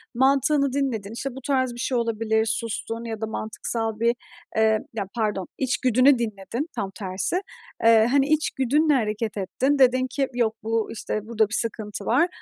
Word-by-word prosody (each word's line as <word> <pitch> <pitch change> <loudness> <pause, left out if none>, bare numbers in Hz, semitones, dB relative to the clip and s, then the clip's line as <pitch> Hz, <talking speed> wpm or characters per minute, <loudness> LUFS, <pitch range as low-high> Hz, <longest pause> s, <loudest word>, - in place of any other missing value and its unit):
mantığını 275 +2 +3
dinledin, 235 -7 -2
işte, 255 +2 -4
bu 265 - -8
tarz 260 -2 0
bir 240 - -10
şey 255 +1 0
olabilir, 220 -1 +1
sustun 225 +1 -3
ya 225 -2 -5
da - - 0
mantıksal 220 0 -3
bir, 235 +1 +2 0.4
eee 220 0 +4
Ya 220 -3 -2
pardon, 210 -5 -1
içgüdünü 255 0 +3
dinledin, 230 - -3
tam 195 -1 -3
tersi. 195 - -1 0.4
Eee, 225 -1 +6
hani, 275 0 +4
içgüdünle 300 0 +2
hareket 215 -3 -1
ettin, 265 +9 0
dedin 255 0 +4
ki, 270 +1 -1
"Yok, 230 -3 +1
bu, 225 0 -1
işte, 215 -1 -4
burada 220 -2 +1
bir 220 - -2
sıkıntı 220 -3 -3
var." 275 +9 +3
230 Hz, 165 wpm, -24 LUFS, 220-265 Hz, 0.4 s, Eee